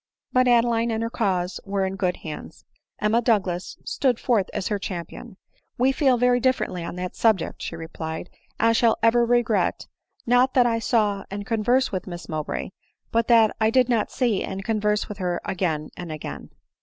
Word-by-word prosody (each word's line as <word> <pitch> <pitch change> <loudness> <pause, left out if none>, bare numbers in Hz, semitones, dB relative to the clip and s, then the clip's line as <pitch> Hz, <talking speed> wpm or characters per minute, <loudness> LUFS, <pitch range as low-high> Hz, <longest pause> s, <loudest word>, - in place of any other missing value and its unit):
But 255 0 +4
Adeline 235 -1 +3
and 225 0 -1
her 230 - -3
cause 180 -3 -1
were 195 -1 -1
in 190 0 -3
good 185 -2 -1
hands; 155 -1 -8 0.3
Em 210 - +1
ma 230 - +4
Douglas 195 -7 0
stood 255 -4 0
forth 225 -6 +1
as - - -3
her 205 -2 -1
champion* 180 0 -7 0.2
" - - -42
We 255 +2 +3
feel 265 -2 +3
very 245 +1 +3
differently 245 -8 0
on 170 - -6
that 180 0 -5
subject," 220 -7 +1
she - - -5
replied. 160 +1 -6 0.3
"I 230 - +4
shall 230 0 +3
ever 235 +1 +5
regret, 235 -2 +1 0.4
not 245 +2 +3
that 250 -2 +5
I 230 -1 +1
saw 210 -4 +1
and 200 +1 -5
conversed 240 +4 +1
with 185 -1 -4
Miss 175 -1 -7
Mow 155 -2 -2
bray, 160 - -4 0.4
but 230 0 +1
that 225 -3 +5
I 220 - +4
did 255 +1 +3
not 230 -4 +1
see 235 -6 0
and 195 0 -5
converse 210 -1 0
with 210 0 -8
her 180 -2 -1
again 160 -5 -2
and 175 -2 -7
again." 155 -1 -7
215 Hz, 195 wpm, -24 LUFS, 185-235 Hz, 0.4 s, ever